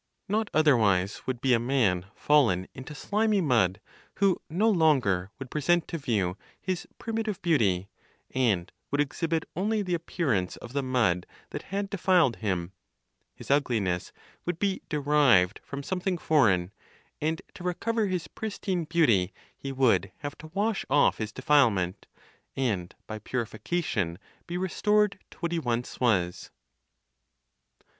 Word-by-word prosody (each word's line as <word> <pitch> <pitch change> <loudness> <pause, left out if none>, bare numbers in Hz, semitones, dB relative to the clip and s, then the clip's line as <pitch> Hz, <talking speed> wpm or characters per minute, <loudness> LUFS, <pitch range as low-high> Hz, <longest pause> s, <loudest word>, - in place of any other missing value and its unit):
Not 215 +2 0
otherwise 110 -11 +3
would 125 -2 -2
be 130 -2 +3
a 115 - +4
man 115 -8 +1
fallen 115 -12 +3
into 135 +3 -9
slimy 210 +7 +1
mud, 115 - +2 0.4
who 195 -2 +2
no 190 +8 +2
longer 135 - +3
would 135 -2 -8
present 170 +3 +2
to 165 - -3
view 100 -9 0 0.2
his 185 -2 -3
primitive 220 -3 -3
beauty, 100 - +2 0.5
and 110 -9 +1 0.2
would 145 - -1
exhibit 160 +3 0
only 210 +4 0
the 180 -2 -2
appearance 145 - -1
of 120 - -11
the 140 - +1
mud 120 -9 +1 0.2
that - - -4
had 200 +1 -2
defiled 180 - +3
him; 95 -5 -2 0.6
his - - -6
ugliness 110 -11 +1 0.3
would 175 -1 -2
be 195 0 0
derived 140 - +3
from 140 0 -6
something 180 +2 -1
foreign; 100 - +3 0.5
and 160 +2 -1
to 175 - -10
recover 215 +5 0
his 180 -4 -2
pristine 195 -4 -3
beauty 120 - +3 0.2
he 135 - -6
would 115 -8 +2
have 145 0 -5
to 155 - -9
wash 210 +1 0
off 145 +2 +4
his 110 -1 -3
defilement, 110 -9 +2 0.5
and 105 -10 -1
by 110 0 -6
purification 110 - -2 0.3
be 175 0 -3
restored 205 +2 +1
to - - -17
what 170 -1 -1
he 170 - 0
once 120 -4 -2
was. 95 -8 +1
140 Hz, 140 wpm, -28 LUFS, 105-175 Hz, 0.6 s, a